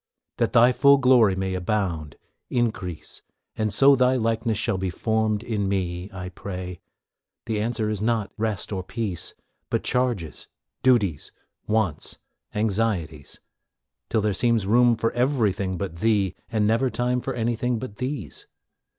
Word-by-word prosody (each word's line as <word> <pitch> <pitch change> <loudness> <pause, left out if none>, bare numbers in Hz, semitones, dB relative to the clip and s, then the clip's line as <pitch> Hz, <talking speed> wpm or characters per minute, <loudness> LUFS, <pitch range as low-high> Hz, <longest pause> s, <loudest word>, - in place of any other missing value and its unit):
That - - 0
Thy 120 +2 +6
full 140 +3 +6
glory 125 -7 +5
may 95 0 -2
abound, 90 -6 -2 0.3
increase, 110 -9 -3 0.3
And 110 -1 -1
so 140 +5 +6
Thy 130 0 +3
likeness 115 -2 0
shall 95 - 0
be 95 0 -1
formed 110 +3 0
in 105 -5 -1
me, 90 -1 -2
I 90 -1 -6
pray; 90 -1 -7 0.7
the 110 -2 -1
answer 110 -1 -1
is 105 -2 -2
not 110 -2 0
rest 110 -2 -2
or 95 - -2
peace, 100 -1 -4 0.3
But - - 0
charges, 120 -10 -1 0.3
duties, 105 - +2 0.4
wants, 105 -8 -1 0.4
anxieties, 100 -9 -1 0.7
Till 110 - +1
there 105 -1 +1
seems 115 0 +1
room 120 +3 +4
for 115 0 0
everything 105 -8 0
but 85 -2 -4
Thee, 100 -1 +2 0.2
And 110 -2 +1
never 115 +5 +2
time 125 +2 0
for 135 0 -4
anything 120 +1 0
but 110 -3 -7
these. 125 - -5
110 Hz, 140 wpm, -24 LUFS, 95-120 Hz, 0.7 s, Thy